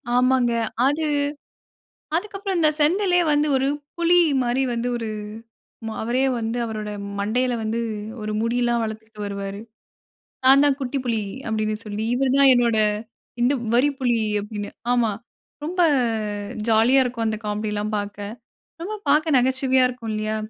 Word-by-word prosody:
ஆமாங்க. 250 -1 +3 0.4
அது 295 +3 0 1.1
அதுக்கப்புறம் 395 0 -2
இந்த 310 -2 +5
செந்திலே 355 +4 +3
வந்து 295 +1 +2
ஒரு 265 +1 +1 0.3
புலி 340 +1 +4 0.3
மாரி, 245 +2 0
வந்து 235 +1 -2
ஒரு 230 - -4 1.0
அவரே 245 +4 0 0.2
வந்து 230 +1 -2
அவருடைய 215 -2 -5 0.2
மண்டையில 245 +5 0
வந்து 225 +2 -1 0.4
ஒரு 215 - -3
முடியெல்லாம் 240 +1 +1
வளர்த்துட்டு 220 0 -7
வருவாரு."நான் 200 +2 -6 0.9
தான் 275 -2 +2
குட்டி 270 +1 -2
புலி" 225 -3 0 0.2
அப்டினு 215 -1 -1
சொல்லி 210 +1 -4
"இவர் 260 +1 +1
தான் 280 -1 +7
என்னோட 240 -2 +2 1.0
வரிப்புலி" 255 -2 +2 0.2
அப்டினு 205 0 -6 0.2
ஆமா. 240 -3 +2 0.5
ரொம்ப 355 +4 -1 0.9
ஜாலியா 230 +4 +5
இருக்கும். 240 -2 -3
அந்த 220 0 -1
காமெடிலாம் 210 0 -2
பார்க்க 205 0 -5 0.5
ரொம்ப 390 +6 -4
பார்க்க 305 +1 +3
நகைச்சுவையா 260 +1 +3
இருக்கும் 245 -3 -5
இல்லயா? 215 0 -2
240 Hz, 125 wpm, -23 LUFS, 220-270 Hz, 1.1 s, தான்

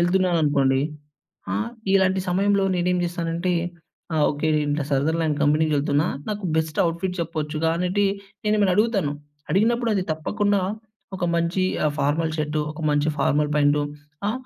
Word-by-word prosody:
ఎళ్తున్నాననుకోండీ. 160 -7 +2 0.7
ఆ - - 0 0.4
ఇలాంటి 190 -1 +3
సమయంలో 200 +2 +2
నేనేం 180 0 +1
చేస్తానంటే 170 +1 -2 0.6
ఆ! - - 0
ఓకె 150 +2 -2 0.2
అంటే 145 0 0
సదర్లాండ్ 155 +2 +1
కంపెనీకెళ్తున్నా 150 +1 +2 0.2
నాకు 205 -2 -3
బెస్ట్ 160 -1 -1
అవుట్‌ఫిట్ 170 +2 -1
చెప్పొచ్చుగా 155 0 -1
అనేటి 185 +3 +1 0.4
నేను 210 0 +3
ఎమన్న 190 -3 +3
అడుగుతాను. 205 -9 +2 0.4
అడిగినప్పుడు 230 +4 +2
అది 190 -2 0
తప్పకుండా 205 +5 0 0.6
ఒక 180 - -5
మంచి 170 +3 +1 0.2
ఆహ్, 150 - +1
ఫార్మల్ 155 +3 +1
షర్డ్ 150 0 -1
ఒక 160 +1 -9
మంచి 145 +1 +2
ఫార్మల్ 150 +2 +2
పాంటు 145 0 +3 0.5
ఆ! - - +1
165 Hz, 135 wpm, -23 LUFS, 150-190 Hz, 0.7 s, ఇలాంటి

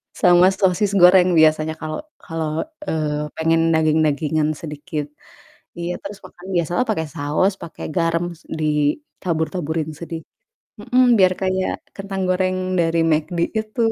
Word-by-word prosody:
sama 175 +1 +5
sosis 195 +1 +1
goreng 180 -1 +6
biasanya 155 0 +3
kalau 155 -1 -5 0.2
kalau, 160 -2 -3 0.2
eee, 150 -1 -1
pengen 165 0 +2
daging-dagingan 155 -1 +1
sedikit. 150 -1 -5 0.7
Iya, 175 +1 -3
terus 200 0 -7
makan 180 +2 -13
biasalah 175 +9 0
pakai 160 -7 0
saus, 150 +7 +1
pakai 170 - -8
garam, 170 0 +1
s - - -24
ditabur-taburin 160 - -2
sedi 165 0 -6 0.6
mhm, 250 +4 +2 0.2
biar 185 -1 +5
kayak 185 0 0 0.2
kentang 195 -1 -5
goreng 185 0 +1 0.2
dari 165 0 +2
McD 160 +3 0 0.2
itu, 220 +2 -4
165 Hz, 125 wpm, -21 LUFS, 155-185 Hz, 0.7 s, goreng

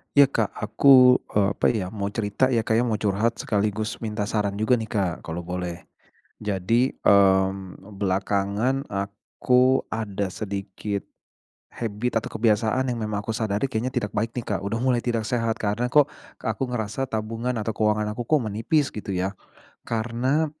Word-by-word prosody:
Iya, 140 0 +9
Kak, 110 -6 +1
aku, 125 +3 +6 0.2
eee, 100 -1 +4
apa - - 0
ya, 105 -5 -1
mau 100 -2 -3
cerita 105 +4 0
ya, 120 -3 +2
Kak, 110 - +1
ya, - - +3
mau 110 - +1
curhat 105 +3 +1
sekaligus 105 +1 -1
minta 105 -2 -3
saran 105 -3 0
juga 110 +4 +2
nih, 110 - -4
Kak, 100 -5 0
kalau 85 +2 -4
boleh. 90 0 -5 0.6
Jadi, 105 +6 +1
mmm, 95 -1 +3 0.2
belakangan 100 +6 0
aku 125 +6 +1
ada 100 -3 -2
sedikit 100 0 -4 0.7
habit, 115 +1 -2
atau - - -7
kebiasaan, 110 +3 +1
yang 120 - -2
memang 105 -2 -2
aku 110 - -5
sadari, 110 +2 -1
kayaknya, 125 +1 -2
tidak 115 -6 -1
baik 115 +2 0
nih, 120 - -3
Kak, - - -6
udah 115 +3 -2
mulai 125 -1 +2
tidak 115 -2 0
sehat. 115 -2 0
Karena, 105 +3 0
"Kok 145 +3 +4 0.3
aku - - -2
ngerasa 120 +1 -3
tabungan, 115 +2 -3
atau 110 -1 -2
keuangan 105 -1 +1
aku, 120 - -3
kok, 155 -2 +3
menipis?" 130 +8 +1
Gitu 100 -2 -5
ya. 95 +2 -2 0.5
Karena, 120 +7 0
110 Hz, 165 wpm, -24 LUFS, 100-120 Hz, 0.7 s, Iya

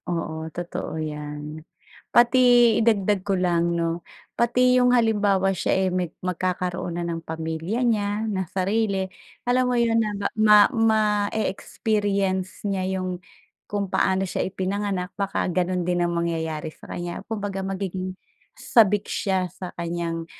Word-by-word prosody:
Oo, 160 -2 -3
totoo 170 -1 -5
'yan. 150 0 -5 0.5
Pati 240 +2 +5 0.4
idagdag 210 -3 +2
ko 195 0 0
lang, 170 -1 +1
'no, 170 0 -1 0.3
pati 250 +2 +3
'yong 250 0 +4
halimbawa 205 -4 +2
siya, 190 +1 +1
eh, - - +1
meg 180 -2 -2
magkakaroon 180 -1 -2
na 175 - -2
ng 165 -1 -3
pamilya 160 +8 -3
niya 210 -2 0
na 190 -5 -2
sarili. 195 0 0 0.4
Alam 250 +1 +3
mo 250 - +1
'yon 230 -1 +3
na 215 - 0 0.3
ma 210 -1 +8 0.2
ma-e-experience 205 -3 0
niya 190 -1 -1
'yong 185 -1 -4 0.5
kung 200 -1 -1
paano 190 0 +2
siya - - -2
ipinanganak, 190 0 -2
baka 200 -1 -1
gano'n 180 0 0
din 175 -1 +1
ang 175 - 0
mangyayari 160 -2 -2
sa - - -15
kaniya. 175 0 -5
Kumbaga 205 -3 -3
magiging 190 -1 -4 0.4
sabik 210 - +3
siya 190 -2 0
sa 185 - -7
kaniyang, 170 -1 -3
190 Hz, 135 wpm, -24 LUFS, 175-210 Hz, 0.5 s, ma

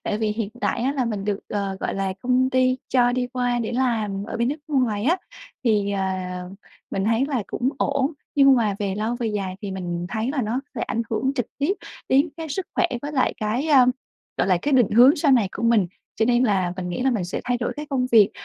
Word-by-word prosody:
Tại 210 - -2
vì 220 - 0
hiện 215 -1 -3
tại 235 - 0
á 265 +3 +1
là 270 -3 0
mình 210 -4 -3
được, 205 -1 -1
ờ, 200 -2 -2
gọi - - -2
là, 195 -1 -1
công 255 +1 +2
ty 255 0 +3
cho 245 -1 +3
đi 250 0 0
qua 245 -1 -1
để 230 -1 -3
làm 220 -6 0
ở - - -4
bên 235 +1 +1
nước 290 - -1
ngoài 240 -7 +1
á, 330 +7 +3 0.5
thì, 210 -4 +2
ờ, 195 -1 -1 0.9
mình 195 - -1
thấy 225 +4 +2
là 265 -6 -1
cũng 250 - -1
ổn. 280 +2 +1 0.2
Nhưng 275 -1 +6
mà 215 -4 +1
về 200 -2 -1
lâu 220 +4 -2
về 240 -1 -2
dài 200 -4 -2
thì 200 - -4
mình 175 -2 -4
thấy 220 +6 -2
là 275 -2 -1
nó 230 +4 -1
sẽ - - -3
ảnh 230 - -1
hưởng 260 +4 0
trực 245 -5 -1
tiếp 290 +7 +2 0.4
đến 275 +5 +4
cái 325 -1 -6
sức 355 +5 -3
khỏe - - +3 0.2
với 290 +1 -4
lại 260 -3 +1
cái, 230 +5 -1
ơ, 265 -4 +6 0.5
gọi - - +1
là, 185 -2 +4
cái 290 - 0
định 245 -5 +4
hướng 250 +6 +7
sau 290 -2 +3
này 230 -7 +4
của - - -6
mình, 230 -5 +4 0.3
cho 220 - +2
nên 240 +1 +3
là 190 -6 +1
mình 180 -1 -4
nghĩ 175 +7 -3
là 265 - +3
mình 220 -7 -1
sẽ 175 - -4
thay 245 0 +1
đổi 240 - -2
cái 300 0 -5
công 265 -4 0
việc. 210 -2 +7
235 Hz, 245 wpm, -23 LUFS, 205-260 Hz, 0.9 s, hướng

